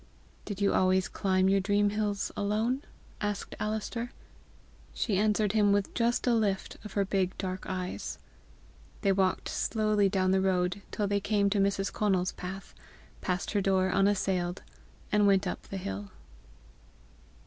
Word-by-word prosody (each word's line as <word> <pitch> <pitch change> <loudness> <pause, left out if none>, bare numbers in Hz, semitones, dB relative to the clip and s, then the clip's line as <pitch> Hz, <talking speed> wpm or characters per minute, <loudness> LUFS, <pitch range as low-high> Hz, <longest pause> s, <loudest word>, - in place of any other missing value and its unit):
"Did 205 -1 -5
you 200 - +3
always 185 0 +3
climb 190 -1 +1
your 195 +1 +4
dream 205 +1 +2
hills 210 -1 -1
alone?" 220 +6 0 0.4
asked 205 -1 -3
Alister. 220 +3 -2 0.9
She 200 -5 0
answered 210 -1 +2
him 210 -1 +3
with 200 -1 +1
just 235 0 +1
a 245 - +3
lift 205 -4 0
of 210 - -8
her 200 -1 +1
big 190 -1 0
dark 185 -1 -4
eyes. 185 -1 -4 0.9
They 200 - +4
walked 190 -1 +1
slowly 215 -2 +1
down 185 -1 +1
the 190 0 +3
road 185 0 +1
till 210 - -1
they 200 0 +1
came 200 0 +1
to 205 - +2
Mrs. 195 0 +1
Conal's 190 -3 +1
path, 190 +2 -7 0.5
passed 180 0 -2
her 205 - +1
door 190 -1 +2
unassailed, 190 -2 +1 0.5
and 210 -1 +4
went 195 -1 +4
up - - -3
the 195 - -5
hill. 100 - -5
200 Hz, 150 wpm, -30 LUFS, 190-210 Hz, 0.9 s, your